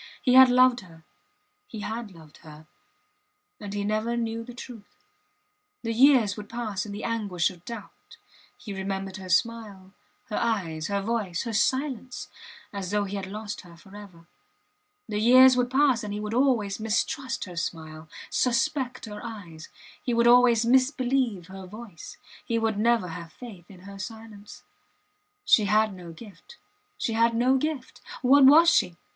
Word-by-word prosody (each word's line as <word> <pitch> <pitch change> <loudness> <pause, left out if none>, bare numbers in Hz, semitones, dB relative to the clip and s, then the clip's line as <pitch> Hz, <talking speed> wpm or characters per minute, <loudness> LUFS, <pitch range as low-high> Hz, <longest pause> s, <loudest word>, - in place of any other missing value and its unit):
He 250 - +1
had 260 0 +9
loved 250 0 +4
her 165 -4 -16 0.6
he 220 - -8
had 225 +1 -5
loved 160 -5 -16
her 155 0 -14 0.9
and 205 -2 -7
he 205 0 -3
never 215 +3 -1
knew 230 -1 -3
the 245 +1 -11
truth... 235 -4 -12 0.8
The 230 -1 -2
years 240 -5 +4
would 210 0 -9
pass 220 -4 -4
in - - -7
the 205 +1 -7
anguish 205 -8 -1
of 175 -2 -16
doubt... 230 -4 -11 0.4
He 205 - -8
remembered 195 0 -4
her 190 -1 -9
smile, 200 -1 -1 0.4
her 210 - -3
eyes, 175 -9 -2
her 200 -1 -2
voice, 205 -6 -2
her 230 - -5
silence, 255 +2 -1 0.4
as 195 -3 -5
though 205 +1 0
he 200 0 -5
had 195 -1 -5
lost 210 +1 -6
her 170 -1 -16
forever. 190 -2 -14 0.8
The 210 -1 -3
years 255 +3 +7
would 250 -1 +1
pass 260 -3 +2
and 210 - -5
he 205 - -4
would 210 +1 -5
always 235 -6 +1
mistrust 230 +4 -2
her 180 -2 -10
smile, 160 -2 -6 0.2
suspect 260 +1 0
her 210 -1 -9
eyes; 185 -9 -9 0.3
he 245 - -2
would 235 0 +3
always 240 -1 +5
misbelieve 255 - +1
her 190 0 -10
voice, 210 -3 -11 0.3
he 230 - -1
would 225 -2 -1
never 230 -4 +2
have 165 -1 -9
faith 200 -9 -12
in 185 -3 -14
her 195 +1 -11
silence. 220 -1 -10 0.8
She 220 - +5
had 215 +1 +2
no 175 -2 -10
gift 210 - -14 0.4
she 230 - -2
had 230 +1 +2
no 250 +3 +3
gift! 280 -2 -4 0.2
What 270 +2 +6
was 315 +5 +7
she? 175 -1 +1
215 Hz, 165 wpm, -26 LUFS, 195-240 Hz, 0.9 s, had